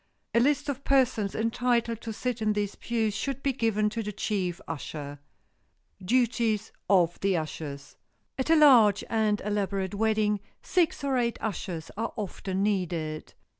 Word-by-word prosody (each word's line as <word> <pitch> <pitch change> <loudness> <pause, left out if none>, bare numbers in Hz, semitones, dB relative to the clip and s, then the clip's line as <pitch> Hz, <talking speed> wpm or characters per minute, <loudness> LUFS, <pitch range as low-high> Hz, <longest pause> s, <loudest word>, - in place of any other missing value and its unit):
A 235 - +5
list 290 +4 +2
of 285 -3 -1
the - - -27
persons 250 -8 +2
entitled 230 0 0
to 225 - -5
sit 240 +1 -3
in 215 -1 +2
these 205 -1 -1
pews 225 -3 -1
should 275 -1 -3
be 275 - +1
given 220 -4 +1
to 225 +1 -2
the 210 -1 -4
chief 190 -4 -2
usher. 145 -2 -6 0.8
[Sidenote: 185 -1 -11 0.2
DUTIES 225 -3 -1 0.2
OF 175 -4 +3
THE 195 0 +1
USHERS] 150 -3 -6 0.4
At 260 - -1
a 325 - +6
large 240 -10 +6
and 215 -2 +2
elaborate 200 -2 -1
wedding 215 0 +1 0.2
six 345 -6 +1
or 270 -2 +1
eight 235 -1 0
ushers 180 -6 -4
are 230 +1 -2
often 195 -2 -3
needed. 170 -6 -2
215 Hz, 160 wpm, -28 LUFS, 195-235 Hz, 0.8 s, a